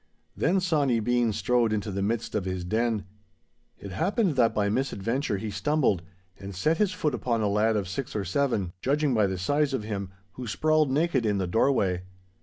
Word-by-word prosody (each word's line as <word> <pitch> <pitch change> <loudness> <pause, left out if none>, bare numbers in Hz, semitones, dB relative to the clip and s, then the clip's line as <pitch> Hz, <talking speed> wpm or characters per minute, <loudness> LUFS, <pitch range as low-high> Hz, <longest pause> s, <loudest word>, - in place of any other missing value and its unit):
Then 190 +3 +2
Sawny 150 -9 +2
Bean 120 +1 +1
strode 115 +2 +1
into 105 -1 -2
the 100 +1 -2
midst 110 +3 -1
of 105 -3 -1
his 95 -1 -3
den. 110 +2 0 0.7
It 100 - -9
happened 190 - +1
that 120 -3 +4
by 105 -1 0
misadventure 115 0 -1
he 105 +2 -4
stumbled 130 - +1 0.4
and 100 -1 -8
set 155 - +1
his 210 -3 +2
foot 155 -6 -1
upon 115 0 -1
a - - +2
lad 105 +2 +2
of 100 -3 -1
six 120 +7 -5
or 100 -2 -1
seven, 100 -4 0
judging 145 +1 +1
by 105 -3 +3
the 95 -1 -3
size 145 +9 +1
of 110 - -3
him, 100 -3 -4 0.2
who 125 +3 -7
sprawled 155 +5 +2
naked 145 -2 +1
in 105 -2 +1
the 95 - 0
doorway. 95 -2 +2
115 Hz, 195 wpm, -27 LUFS, 100-140 Hz, 0.7 s, that